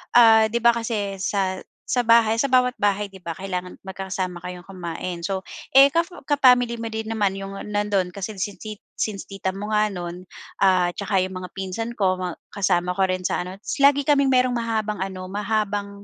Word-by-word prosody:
ah, 225 Hz, -2 st, +7 dB
'di 235 Hz, -, 0 dB
ba 235 Hz, 0 st, +4 dB
kasi 215 Hz, -4 st, -2 dB
sa 190 Hz, -1 st, -1 dB, 0.3 s
sa 245 Hz, -1 st, +1 dB
bahay 225 Hz, -1 st, +5 dB
sa 275 Hz, -, +2 dB
bawat 250 Hz, 0 st, +3 dB
bahay, 205 Hz, 0 st, 0 dB
'di 190 Hz, -, -13 dB
ba, 170 Hz, -, -4 dB
kailangan 180 Hz, 0 st, -5 dB
magkakasama 190 Hz, -2 st, -4 dB
kayong 180 Hz, 0 st, -8 dB
kumain. 175 Hz, -1 st, -5 dB
So, 190 Hz, 0 st, -2 dB, 0.3 s
eh, 275 Hz, +1 st, +8 dB
ka 335 Hz, +3 st, +1 dB, 0.2 s
ka 290 Hz, -1 st, +2 dB
family 245 Hz, -3 st, +4 dB
mo 230 Hz, -, -5 dB
din 220 Hz, 0 st, -4 dB
naman 205 Hz, -3 st, +1 dB
yung 195 Hz, 0 st, -6 dB
nandun 205 Hz, -3 st, -1 dB
kasi 200 Hz, +1 st, -6 dB
sin 200 Hz, +1 st, -4 dB
sin 215 Hz, -1 st, -7 dB, 0.2 s
since 205 Hz, -3 st, -2 dB
tita 195 Hz, -1 st, -4 dB
mo 210 Hz, +2 st, -5 dB
nga 215 Hz, 0 st, +3 dB
nun, 180 Hz, -1 st, -7 dB, 0.3 s
ah, 185 Hz, -2 st, +4 dB
tsaka 200 Hz, -1 st, -1 dB
yung 190 Hz, -, -5 dB
mga 180 Hz, -, -7 dB
pinsan 195 Hz, +5 st, -4 dB
ko 185 Hz, -2 st, +1 dB
ma 180 Hz, -2 st, -3 dB, 0.2 s
kasama 180 Hz, -3 st, +1 dB
ko 195 Hz, -, +1 dB
rin 185 Hz, 0 st, -2 dB
sa -, -, 0 dB
ano 180 Hz, +1 st, -6 dB
tapos 220 Hz, -, -5 dB
lagi 285 Hz, 0 st, +6 dB
kaming 280 Hz, -1 st, +4 dB
mayroong 255 Hz, -1 st, +3 dB
mahahabang 220 Hz, -3 st, -2 dB
ano 190 Hz, -1 st, -4 dB
mahabang 205 Hz, -1 st, -1 dB
200 Hz, 200 wpm, -23 LUFS, 185-225 Hz, 0.3 s, eh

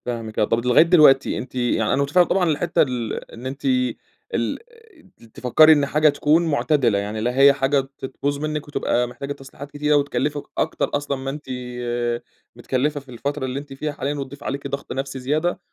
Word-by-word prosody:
فاهمِك 115 Hz, -3 st, -4 dB
آه، -, -, +4 dB
طب 115 Hz, -, +1 dB
أنتِ 120 Hz, -, -4 dB
لغاية 125 Hz, +5 st, +6 dB
دلوقتي 155 Hz, -6 st, +5 dB
أنتِ 130 Hz, -, -7 dB
يعني 120 Hz, -3 st, +1 dB
أنا 140 Hz, -, +1 dB
مُتفهم 160 Hz, +6 st, +4 dB
طبعًا 180 Hz, -1 st, +1 dB
الحتة 160 Hz, +3 st, +1 dB
ال 125 Hz, -5 st, -1 dB, 0.2 s
إن 120 Hz, +2 st, -11 dB
أنتِ 135 Hz, +2 st, -6 dB, 0.7 s
ال 115 Hz, -, -1 dB, 0.6 s
ت -, -, -21 dB
تفكري 155 Hz, +6 st, +6 dB
إن 145 Hz, -2 st, +2 dB
حاجة 150 Hz, +2 st, +3 dB
تكون 150 Hz, +3 st, +2 dB
مُعتدلة؛ 140 Hz, -6 st, +2 dB
يعني 105 Hz, +2 st, -3 dB
لا 125 Hz, +3 st, -1 dB
هي 140 Hz, 0 st, +8 dB
حاجة 135 Hz, +1 st, +1 dB, 0.2 s
ت -, -, -6 dB
تبوظ 140 Hz, +2 st, -3 dB
منِك 150 Hz, 0 st, -3 dB
وتبقى 125 Hz, -4 st, 0 dB
محتاجة 140 Hz, +4 st, -6 dB
تصليحات 135 Hz, +1 st, -11 dB
كتيرة 150 Hz, +1 st, +1 dB
وتكلفِك 145 Hz, +1 st, 0 dB
أكتر -, -, 0 dB
أصلًا 145 Hz, -1 st, -1 dB
ما 135 Hz, +1 st, -5 dB
أنتِ 145 Hz, +2 st, -7 dB, 1.1 s
متكلفة 145 Hz, +3 st, -1 dB
في 135 Hz, -1 st, -19 dB
الفترة 140 Hz, +3 st, -3 dB
اللي 130 Hz, +1 st, -3 dB
أنتِ 145 Hz, -1 st, -10 dB
فيها 150 Hz, +3 st, -3 dB
حاليًا 145 Hz, 0 st, -3 dB
وتضيف 140 Hz, -1 st, -7 dB
عليكِ 140 Hz, 0 st, -4 dB
ضغط 140 Hz, 0 st, -6 dB
نفسي 135 Hz, +1 st, -4 dB
زيادة 155 Hz, +8 st, -1 dB
140 Hz, 190 wpm, -22 LUFS, 125-150 Hz, 1.1 s, هي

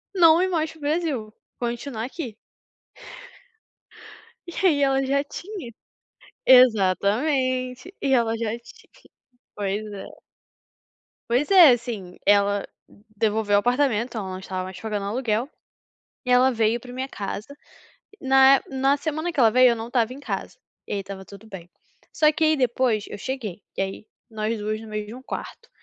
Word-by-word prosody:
não 330 Hz, -1 st, +6 dB
ir 375 Hz, -, +2 dB
mais 320 Hz, -3 st, -1 dB
para 320 Hz, -, -16 dB
o -, -, -20 dB
Brasil, 290 Hz, -8 st, -2 dB, 0.3 s
continuar 240 Hz, -1 st, -4 dB
aqui. 255 Hz, -6 st, -7 dB, 2.1 s
E 345 Hz, -, -6 dB
aí 300 Hz, -6 st, +4 dB
ela 270 Hz, -1 st, +2 dB
já 280 Hz, +1 st, +1 dB
tinha 350 Hz, -, -8 dB, 0.7 s
Exatamente. 255 Hz, -, +3 dB
E 270 Hz, -, +1 dB
ela 230 Hz, -3 st, +2 dB
já 225 Hz, -1 st, -2 dB
tinha 235 Hz, -, -19 dB, 0.5 s
pois 205 Hz, +1 st, -2 dB
é. 195 Hz, -, -10 dB, 1.1 s
Pois 260 Hz, +7 st, +1 dB
é, 360 Hz, -7 st, +9 dB
assim, 225 Hz, -7 st, -4 dB
ela 205 Hz, 0 st, +3 dB, 0.5 s
devolveu 210 Hz, -1 st, +1 dB
o -, -, +5 dB
apartamento, 245 Hz, 0 st, +1 dB
ela 195 Hz, -3 st, -4 dB
não 185 Hz, -, -5 dB
estava 185 Hz, -1 st, -5 dB
mais 185 Hz, 0 st, -8 dB
pagando 210 Hz, -2 st, -3 dB
aluguel, 235 Hz, +3 st, -1 dB, 0.8 s
e -, -, -5 dB
ela 250 Hz, +1 st, +5 dB
veio 225 Hz, -1 st, +1 dB
pra 245 Hz, +1 st, -12 dB
minha 260 Hz, +1 st, -4 dB
casa. 205 Hz, -3 st, -6 dB, 0.7 s
Na 270 Hz, 0 st, +6 dB
é -, -, -1 dB
na 270 Hz, +1 st, +2 dB
semana 315 Hz, +3 st, -3 dB
que 320 Hz, -, -4 dB
ela 230 Hz, -3 st, +6 dB
veio, 255 Hz, +2 st, +6 dB
eu -, -, 0 dB
não 225 Hz, 0 st, -5 dB
estava 240 Hz, -1 st, 0 dB
em 265 Hz, -, -8 dB
casa, 285 Hz, -, -5 dB, 0.3 s
e -, -, -4 dB
aí 200 Hz, -, -1 dB
estava 195 Hz, 0 st, -8 dB
tudo 200 Hz, +2 st, -14 dB
bem. 185 Hz, -4 st, -10 dB, 0.4 s
Só 305 Hz, -1 st, +4 dB
que 315 Hz, +1 st, -2 dB
aí 310 Hz, 0 st, +4 dB
depois 240 Hz, -4 st, +1 dB
eu 205 Hz, -, -8 dB
cheguei, 220 Hz, -6 st, -5 dB, 0.2 s
e -, -, 0 dB
aí 195 Hz, +2 st, -5 dB, 0.2 s
nós 220 Hz, +1 st, -2 dB
2 215 Hz, +1 st, -3 dB
no 225 Hz, -, -10 dB
meio 215 Hz, 0 st, -4 dB
de 245 Hz, +5 st, -10 dB
quarto. -, -, -7 dB
240 Hz, 165 wpm, -24 LUFS, 210-270 Hz, 2.1 s, é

